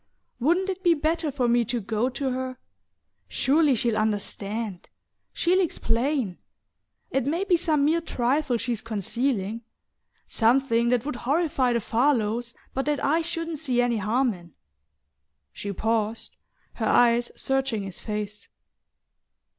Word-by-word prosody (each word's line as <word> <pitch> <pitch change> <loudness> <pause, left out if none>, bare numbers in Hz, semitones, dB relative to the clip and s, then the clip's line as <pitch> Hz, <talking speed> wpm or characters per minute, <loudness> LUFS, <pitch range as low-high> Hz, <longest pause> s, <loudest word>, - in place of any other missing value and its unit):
Wouldn't 345 +9 +2
it 380 -1 -3
be 345 -3 +4
better 315 +1 0
for 255 -3 0
me 240 0 +3
to 240 +2 -1
go 220 +3 -1
to 265 0 -2
her? 255 0 -3 0.7
Surely 290 0 +3
she'll 230 0 0
understand 210 -1 -2 0.4
she'll 360 +2 +2
explain... 250 - 0 0.7
It 270 -1 0
may 335 +6 0
be 380 -3 +3
some 315 -4 +2
mere 330 +3 +2
trifle 255 -2 0
she's 230 -1 -2
concealing: 225 0 -2 0.6
something 235 0 +2
that 245 0 +1
would 295 -4 -3
horrify 280 -1 +1
the 235 - +2
Farlows, 235 -1 +1 0.2
but 270 - -1
that 295 -1 0
I 315 +4 +3
shouldn't 330 -1 -4
see 250 -3 0
any 245 -1 +2
harm 230 +4 +1
in..." 170 -3 -14 1.0
She 200 - -5
paused, 220 +2 -1 0.4
her 220 - -2
eyes 240 0 +4
searching 270 -6 -1
his 195 -2 -7
face. 210 -1 -5
245 Hz, 135 wpm, -26 LUFS, 225-290 Hz, 1.0 s, be